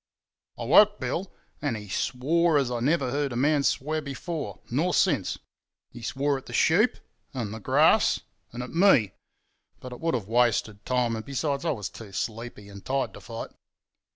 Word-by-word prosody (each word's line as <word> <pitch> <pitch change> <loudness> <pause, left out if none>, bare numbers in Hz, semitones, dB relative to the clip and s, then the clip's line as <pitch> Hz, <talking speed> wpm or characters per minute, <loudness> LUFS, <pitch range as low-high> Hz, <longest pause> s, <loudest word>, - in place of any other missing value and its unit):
"I - - -5
woke 205 - +6
Bill, 190 +2 -3 0.3
and 145 -7 -1
he 105 -1 -9
swore 150 - +1
as 135 -3 +1
I 120 - -1
never 135 0 +1
heard 140 0 -1
a - - -4
man 145 +4 +3
swear 155 +3 0
before—nor 145 - -3
since. - - +2 0.5
He 120 - -11
swore 140 +4 -1
at - - -18
the - - -9
sheep, 205 +9 +3 0.4
and 110 -5 -3
the 110 - -6
grass, - - +3 0.3
and 120 +1 -5
at 125 - -8
me; 165 - +4 0.7
but 125 - -9
it 125 - -10
would 165 -2 0
have 110 -6 -3
wasted 115 -3 +1
time, 125 -2 +1
and 110 - -5
besides 140 +3 -2
I - - +1
was 105 -9 -2
too 105 -4 -11
sleepy 110 0 -5
and 100 -1 -11
tired 135 0 -1
to - - -11
fight. 115 -1 -7
130 Hz, 180 wpm, -27 LUFS, 115-150 Hz, 0.7 s, woke